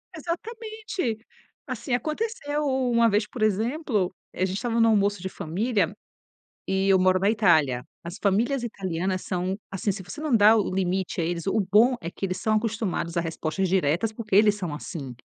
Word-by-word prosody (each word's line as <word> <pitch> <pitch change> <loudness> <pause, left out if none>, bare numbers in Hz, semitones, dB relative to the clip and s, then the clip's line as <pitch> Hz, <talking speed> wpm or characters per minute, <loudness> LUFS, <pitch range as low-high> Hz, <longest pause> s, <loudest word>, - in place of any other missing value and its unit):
Exatamente. 415 - -4 0.5
Assim, 255 -1 -4
aconteceu 305 - -2
u 265 -3 0
uma 235 -1 +4
vez, 210 +1 +1
por 245 - -8
exemplo, 215 - 0 0.2
a - - -12
gente 190 - -3
estava 235 +2 -1
no 230 - +5
almoço 205 -3 +2
de 190 - -4
família 190 +2 -1 0.7
e 190 +1 +1
eu 190 -1 +5
moro 185 0 +4
na 195 +2 +2
Itália. 155 - +3 0.2
As 170 +2 -7
famílias 235 +6 +1
italianas 185 -4 -2
são 185 0 -2
assim, 195 +2 -1
se 195 +1 -6
você 180 +8 -9
não 295 -6 +2
dá 215 +1 +7
o 215 - +4
o - - -4
limite 185 -1 -1
a - - 0
eles 170 0 -2
o 200 - +1
bom 240 +5 +6
é 170 - -4
que 195 - -4
eles 185 -1 -3
são 215 +3 +1
acostumados 215 -6 -2
a 170 - +3
respostas 165 +3 -2
diretas, 180 +4 +1
porque 215 -3 -3
eles 210 0 +6
são 180 -7 -4
assim. 145 -4 -6
205 Hz, 190 wpm, -25 LUFS, 185-235 Hz, 0.7 s, dá